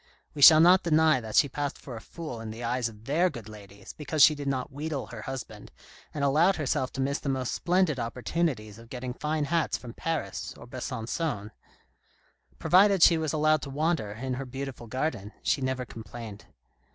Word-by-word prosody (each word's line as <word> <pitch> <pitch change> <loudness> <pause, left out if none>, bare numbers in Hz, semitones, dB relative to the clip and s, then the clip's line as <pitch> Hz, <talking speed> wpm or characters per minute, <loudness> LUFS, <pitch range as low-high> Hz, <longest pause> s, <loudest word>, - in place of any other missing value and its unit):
We 145 - -6
shall 155 +2 +10
not 180 +3 +6
deny 155 -4 +3
that 110 -1 -6
she - - +6
passed 145 +1 -4
for 125 - -9
a 110 - -8
fool 155 -7 -8
in 115 - -6
the 115 +2 -7
eyes 120 0 -1
of 110 0 -16
their 165 +7 +2
good 120 - -9
ladies 100 -2 -12
because 150 0 +1
she 155 - +8
did 145 -1 -6
not 135 +1 -2
wheedle 145 0 -4
her 115 -3 -9
husband, 110 -4 -7 0.4
and 145 - -4
allowed 160 +8 +4
herself 130 -4 -1
to 135 - -3
miss 140 +2 -1
the 140 - -4
most 130 -2 -1
splendid 180 -5 +1
opportunities 120 -2 -2
of 115 0 -15
getting 125 0 -5
fine 150 +3 -2
hats 165 +1 0
from 120 -2 -10
Paris 165 +2 -4
or - - -11
Besancon. 125 -1 -4 1.1
Provided 195 -1 +4
she 165 -2 +6
was 155 -2 -1
allowed 155 0 +2
to 140 - -6
wander 150 -5 -1
in 130 +4 -4
her 135 +2 -4
beautiful 135 -2 -7
garden, 115 -4 -3
she 140 - +1
never 130 -1 -2
complained. 110 -2 -9
135 Hz, 190 wpm, -28 LUFS, 115-155 Hz, 1.1 s, shall